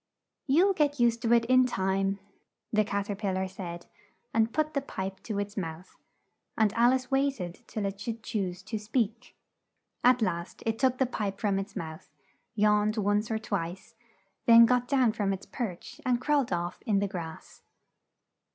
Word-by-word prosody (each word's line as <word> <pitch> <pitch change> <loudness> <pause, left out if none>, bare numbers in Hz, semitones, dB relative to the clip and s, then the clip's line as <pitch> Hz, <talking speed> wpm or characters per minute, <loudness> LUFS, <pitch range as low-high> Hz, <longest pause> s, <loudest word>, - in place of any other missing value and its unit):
"You'll 350 +9 +4
get 290 -5 +1
used 235 -1 +3
to 235 -2 0
it 235 -1 +5
in 255 +1 +5
time," 195 -2 0 0.6
the 215 0 +4
Cat 200 -1 -2
er - - -2
pil 195 -2 -2
lar 190 0 -1
said, 175 -2 -7 0.5
and 225 0 +2
put 310 +2 0
the 280 - 0
pipe 190 -7 -5
to 215 -3 -4
its 205 0 -3
mouth, 170 -2 -6 0.6
and 215 -2 +3
Al 240 +2 +5
ice 255 0 -2
wait 270 -1 +1
ed 175 -1 -6
till 210 -2 -3
it 195 0 -4
should 225 0 -5
choose 190 -5 -3
to 215 +2 -4
speak. 225 +2 -2 0.7
At 250 -1 +5
last 170 -3 -3
it 225 0 -1
took 260 -2 +2
the 265 - +3
pipe 205 -5 -3
from 200 -2 +1
its 195 +1 -6
mouth, 160 -5 -7 0.5
yawned 210 0 +3
once 205 +1 +1
or 220 - 0
twice, 195 -1 -4 0.5
then 230 0 +9
got 250 +1 +2
down 255 -4 +3
from 205 -3 0
its 195 - -7
perch 230 - -6
and 250 -3 +1
crawled 280 -2 +1
off 175 0 -2
in 210 -3 +3
the 200 +1 +1
grass. 170 -5 -8
215 Hz, 180 wpm, -29 LUFS, 195-245 Hz, 0.7 s, then